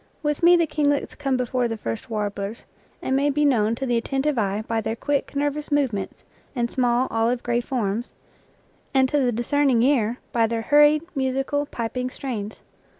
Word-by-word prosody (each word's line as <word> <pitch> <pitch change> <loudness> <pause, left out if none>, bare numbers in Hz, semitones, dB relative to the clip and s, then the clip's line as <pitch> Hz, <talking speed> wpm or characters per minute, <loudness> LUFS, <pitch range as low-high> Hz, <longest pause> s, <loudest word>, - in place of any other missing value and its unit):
With 295 -1 -1
me 345 +1 +7
the 335 - +3
kinglets 290 -2 0
come 275 -3 -1
before 250 0 0
the 225 -1 -4
first 115 - -5
warblers, 205 0 -4 0.4
and 265 - 0
may 280 +2 +2
be 295 +1 +1
known 230 -5 +2
to 270 - -4
the 240 -2 +1
attentive 270 +5 0
eye 205 0 -1
by 225 -1 0
their 220 +1 -2
quick, 285 +3 -2
nervous 290 +1 -2
movements, 255 -10 -1 0.3
and 235 -1 -1
small, 245 0 +2
oiive 230 +2 0
gray 240 0 0
forms, 235 -2 -2 0.8
and 265 -1 +5
to 295 - +2
the 250 -3 +2
discerning 245 +1 +2
ear 245 -4 +2
by 230 -1 +2
their 225 0 -2
hurried, 295 +3 +5
musical, 270 +2 -1
piping 250 +1 -3
strains. 225 -6 -5
250 Hz, 175 wpm, -23 LUFS, 225-285 Hz, 0.8 s, me